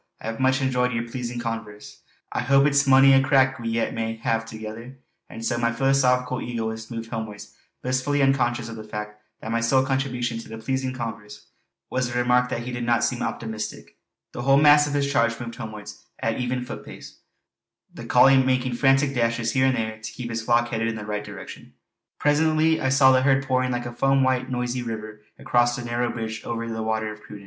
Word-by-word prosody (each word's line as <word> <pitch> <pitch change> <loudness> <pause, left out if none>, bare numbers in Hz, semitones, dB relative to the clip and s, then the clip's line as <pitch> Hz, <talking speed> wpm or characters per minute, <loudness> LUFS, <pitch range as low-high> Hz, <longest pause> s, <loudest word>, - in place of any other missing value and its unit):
I 115 - -4
hae 115 - -9
much 130 +1 +2
enjoyed 125 -1 +1
yer 115 0 -1
pleasin' 120 0 -5
converse. 115 -3 -6 0.3
I - - -2
hope 135 +2 +4
it's 140 -1 +3
mony 135 0 +7
a 135 - +6
crack 130 -1 +3
we 115 -1 -3
yet 115 0 -1
may 115 0 -3
hae 115 0 0
thegither!" 115 +3 -9 0.3
And 115 - -7
so 120 -1 0
my 115 0 +1
philosophical 125 0 +1
egoist 110 -2 -4
moved 115 -1 -6
homewards, 110 -3 -6 0.3
blissfully 130 +3 0
unconscious 120 -3 +1
of 115 -1 -8
the 110 - -7
fact 105 0 -7 0.2
that 110 - -5
my 115 0 0
sole 130 +3 +3
contribution 125 -3 -1
to - - -11
the 110 - -7
"pleasing 130 +3 -2
converse" 110 -4 -7 0.5
was 130 -1 0
the 120 - -2
remark 125 0 +2
that 120 - -3
he 125 - -5
did 120 0 -4
not 120 -1 +2
seem 125 - -1
optimistic. 110 -2 -5 0.3
The - - -6
whole 135 +2 +4
mass 145 0 +6
of 145 - -3
his 140 -1 +1
charge 115 -2 +2
moved 120 -1 -6
homewards 110 -3 -9
at 115 - -1
an 125 - -4
even 125 0 -2
footpace, - - -10 0.7
the - - -9
collie 135 0 +6
making 130 -1 0
frantic 135 +1 +3
dashes 115 -2 0
here 130 +1 +3
and 130 - +1
there 110 -1 -3
to 110 - -7
keep 120 -2 -6
his 115 0 -2
flock 120 +1 +2
headed 115 -1 -1
in 115 - -2
the 105 -1 -7
right 105 -1 -3
direction. - - -10 0.4
Presently 155 +2 +2
I 130 - +1
saw 130 0 +6
the 130 0 +4
herd 135 0 +2
pouring 130 -1 +1
like 120 -1 -2
a 120 - -6
foam 135 +2 +2
white 130 -1 +1
noisy 125 0 -2
river 110 -2 -6 0.2
across 120 0 +2
the 120 -1 -6
narrow 120 +1 -1
bridge 110 -1 -5
over 115 0 -4
the 110 -1 -4
Water 110 0 -1
of 105 - -15
Cruden. 105 -1 -11
120 Hz, 210 wpm, -24 LUFS, 115-130 Hz, 0.7 s, mony